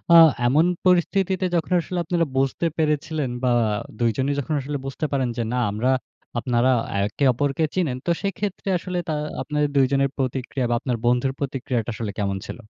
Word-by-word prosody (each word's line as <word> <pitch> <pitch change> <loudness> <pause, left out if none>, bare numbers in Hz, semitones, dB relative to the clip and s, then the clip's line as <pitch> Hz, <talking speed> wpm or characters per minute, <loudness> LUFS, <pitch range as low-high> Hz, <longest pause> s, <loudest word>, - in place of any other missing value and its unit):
আ - - +11 0.3
এমন 150 +7 +4 0.2
পরিস্থিতিতে 185 +1 +2
যখন 170 +1 -1
আসলে 180 +2 -5
আপনারা 170 0 +1
বুঝতে 135 +5 +1
পেরেছিলেন 150 -2 0
বা 125 - +3 0.5
২ 120 -1 +3
জনই 135 +2 +1
যখন 140 +3 -2
আসলে 145 +2 -3
বুঝতে 135 +3 -3
পারেন 135 -3 +1
যে, 120 - 0
না 125 - +1
আমরা, 115 +6 +1 0.5
আপনারা 125 +1 +2 0.3
একে 105 +7 -1
অপরকে 145 +5 0
চিনেন। 160 -9 0
তো 175 - +2
সেক্ষেত্রে 200 -1 -3
আসলে 180 +1 -4
তা 155 - 0 0.3
আপনাদের 150 -1 0
২ 135 - +6
জনের 140 0 +2
প্রতিক্রিয়া 130 0 -2
বা 120 - +2
আপনার 125 -2 -2
বন্ধুর 125 +2 +2
প্রতিক্রিয়াটা 130 -4 -2
আসলে 110 -2 -3
কেমন 100 -1 0
ছিল? - - -7
140 Hz, 175 wpm, -23 LUFS, 125-165 Hz, 0.5 s, আ